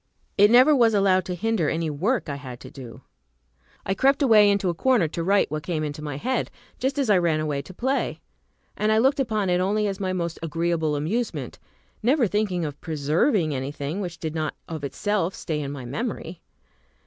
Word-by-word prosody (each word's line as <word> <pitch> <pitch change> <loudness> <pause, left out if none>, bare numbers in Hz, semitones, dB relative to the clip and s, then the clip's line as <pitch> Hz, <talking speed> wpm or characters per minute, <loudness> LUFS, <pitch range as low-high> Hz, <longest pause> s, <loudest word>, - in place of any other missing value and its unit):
It 205 +1 +6
never 255 +6 +7
was 230 -4 +4
allowed 190 -2 +3
to 180 - -3
hinder 210 -4 0
any 165 0 -1
work 200 - 0
I 140 -2 -4
had 130 -4 -9
to - - -11
do. 125 -4 -10 0.8
I 195 - 0
crept 275 +7 +2
away 215 -5 +6
into 200 -1 +1
a - - 0
corner 235 -1 +2
to 165 +2 -4
write 195 -3 +2
what 155 0 -2
came 160 -1 -2
into 150 0 -5
my 145 -3 -5
head, 250 - -1 0.3
just 265 +2 -1
as 275 -3 +1
I 190 - +5
ran 165 -3 +1
away 150 -2 -1
to 145 - -12
play; 260 +9 -1 0.6
and 215 +1 +1
I 220 - +4
looked 270 +5 +3
upon 215 -7 0
it 180 0 +2
only 210 +3 +1
as 195 -1 -2
my 190 -2 -1
most 170 -2 -3
agreeable 165 -1 -1
amusement, 205 +12 -3 0.4
never 250 +3 +3
thinking 195 -4 0
of 145 -1 -7
preserving 160 - +1
anything 140 +6 -4
which 175 -3 -5
did 160 -2 -4
not 155 -2 -2
of 160 -3 -6
itself 185 +6 -1
stay 150 -2 -3
in 140 -1 -4
my 135 -3 -7
memory. 180 - -5
180 Hz, 200 wpm, -24 LUFS, 155-215 Hz, 0.8 s, never